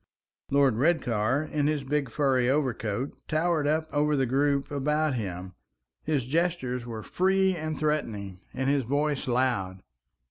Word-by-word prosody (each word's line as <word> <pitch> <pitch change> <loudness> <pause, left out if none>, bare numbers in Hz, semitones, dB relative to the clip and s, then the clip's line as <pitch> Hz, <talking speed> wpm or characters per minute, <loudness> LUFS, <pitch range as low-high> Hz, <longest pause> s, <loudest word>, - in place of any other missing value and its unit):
Lord 140 -5 +3
Redcar, 130 -3 +1
in 150 -2 -1
his 150 -2 0
big 140 -1 -1
furry 130 -1 +2
overcoat, 130 -3 -1
towered 155 -1 +1
up 155 +1 +1
over 150 0 +2
the 135 - +2
group 140 +2 +1
about 150 +1 +1
him; 95 -5 -4 0.5
his 145 -5 -1
gestures 130 -5 -1
were 110 -2 -6
free 190 0 +2
and 155 -2 -4
threatening, 110 -11 -2
and 130 +1 -2
his 140 -1 +2
voice 145 +3 -1
loud. 120 -7 0
140 Hz, 140 wpm, -27 LUFS, 120-150 Hz, 0.5 s, Lord